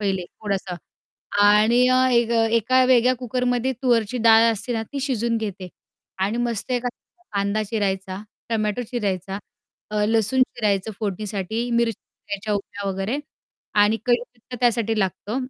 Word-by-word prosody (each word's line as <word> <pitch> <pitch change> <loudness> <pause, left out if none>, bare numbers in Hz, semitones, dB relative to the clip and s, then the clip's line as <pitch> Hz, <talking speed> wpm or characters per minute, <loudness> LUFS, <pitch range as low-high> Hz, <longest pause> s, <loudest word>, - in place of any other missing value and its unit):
पहिले 195 -3 -1
थोडंसं. 195 -1 -4 0.7
आणि 215 +4 +5
अ, 255 0 +4
एक 235 -1 +3
अ, 225 -1 +3
एका 255 +3 +3
वेगळ्या 255 0 +4
कुकरमध्ये 250 +1 -1
तूरची 240 -2 +2
डाळ 225 0 +8
असते 235 +4 -4
ना 225 - -1
ती 280 - -3
शिजवून 235 -4 0
घेते 195 -4 -5 0.5
आणि 205 +4 0
मस्त 235 +1 -3
एखादा 245 +8 -5
कांदा 200 +1 0
चिरायचा, 195 -3 -2 0.3
टोमॅटो 215 +1 -1
चिरायचा, 195 -4 -2 0.5
अ, 210 -1 +1
लसूण 225 +3 +2
चिरायचं 210 -5 0
फोडणीसाठी, 210 +3 -3
मिरची 235 -1 +2
चिरायच्या 210 0 -6
उभ्या 205 0 -4
वगैरे 195 +8 -2 0.6
आणि 210 +2 +3
कढीपत्ता 245 0 -2
त्यासाठी 225 -2 +2
लागतो 195 +3 -2
220 Hz, 135 wpm, -23 LUFS, 200-245 Hz, 0.7 s, डाळ